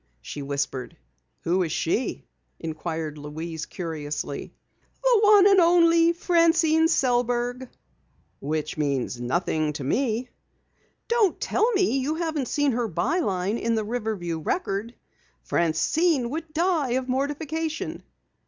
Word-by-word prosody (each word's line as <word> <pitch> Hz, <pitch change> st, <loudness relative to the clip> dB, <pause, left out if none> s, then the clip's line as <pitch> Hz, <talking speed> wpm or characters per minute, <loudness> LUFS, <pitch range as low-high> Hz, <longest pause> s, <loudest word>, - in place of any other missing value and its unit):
she 145 Hz, -, -7 dB
whispered. 140 Hz, -2 st, -3 dB, 0.4 s
"Who 180 Hz, +3 st, +1 dB
is 165 Hz, -3 st, -1 dB
she?" -, -, -1 dB, 0.3 s
inquired 160 Hz, -1 st, -4 dB
Louise 160 Hz, +2 st, -6 dB
curiously. 150 Hz, -4 st, -5 dB, 0.5 s
"The -, -, +5 dB
one 415 Hz, -2 st, +7 dB
and 395 Hz, -1 st, +6 dB
only 335 Hz, -1 st, +5 dB
Francine 330 Hz, -2 st, +3 dB
Sellberg." 245 Hz, -2 st, 0 dB, 0.7 s
"Which 155 Hz, +1 st, -3 dB
means 135 Hz, -4 st, -1 dB
nothing 155 Hz, +3 st, 0 dB
to 145 Hz, -, -5 dB
me." 240 Hz, -, 0 dB, 0.8 s
"Don't 460 Hz, -6 st, +2 dB
tell 460 Hz, +3 st, +1 dB
me 375 Hz, -9 st, +2 dB
you 290 Hz, +4 st, -1 dB
haven't 320 Hz, -5 st, -2 dB
seen 290 Hz, +2 st, +1 dB
her 240 Hz, -1 st, -1 dB
by 260 Hz, -, 0 dB
line 195 Hz, -, -1 dB
in 230 Hz, 0 st, 0 dB
the 220 Hz, -, 0 dB
Riverview 210 Hz, -8 st, -3 dB
Record! 215 Hz, -, -2 dB, 0.5 s
Francine 245 Hz, -, +1 dB
would 320 Hz, +1 st, -5 dB
die 320 Hz, -6 st, +1 dB
of 260 Hz, 0 st, -1 dB
mortification." 300 Hz, +4 st, -2 dB
245 Hz, 120 wpm, -25 LUFS, -, 0.8 s, one